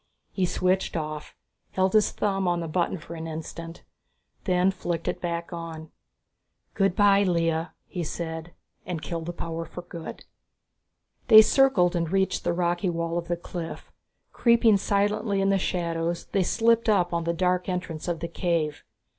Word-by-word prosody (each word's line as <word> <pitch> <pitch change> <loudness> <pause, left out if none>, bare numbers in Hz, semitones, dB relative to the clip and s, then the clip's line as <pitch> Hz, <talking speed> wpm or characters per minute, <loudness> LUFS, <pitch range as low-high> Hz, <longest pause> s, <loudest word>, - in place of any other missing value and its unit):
He 185 -2 0
switched 185 0 0
off, 155 -1 -5 0.4
held 190 0 +1
his 215 -1 +5
thumb 195 -2 -1
on 175 -1 +1
the 165 - -3
button 175 +3 0
for 165 0 -10
an 165 -1 -6
instant, 165 +1 -7 0.6
then 185 0 +3
flicked 175 -3 -4
it - - -2
back 170 0 -3
on. 165 -2 -7 0.8
"Good 195 -2 +1
by 200 -1 +5
Lea," 165 -3 +1 0.2
he 175 - -4
said, 160 +1 -5 0.3
and 170 -3 -5
killed 165 -1 -4
the - - -2
power 165 -1 -5
for 170 +2 -9
good. 170 -2 -8 1.0
They 220 0 +10
circled 215 -9 +4
and 170 -1 -1
reached 190 0 +1
the - - +1
rocky 175 +2 0
wall 170 0 -2
of 170 - -8
the 175 - -1
cliff. 170 -1 -7 0.4
Creeping 235 -3 +4
silently 205 +1 0
in 195 0 +2
the 195 - +2
shadows, 170 -2 -2
they 195 - +2
slipped 230 +4 +2
up 180 -5 +2
on 170 -1 -1
the 170 - +1
dark 180 +1 0
entrance 180 -3 -4
of 170 -2 -2
the 170 - -2
cave. 170 -3 -1
175 Hz, 165 wpm, -26 LUFS, 165-190 Hz, 1.0 s, They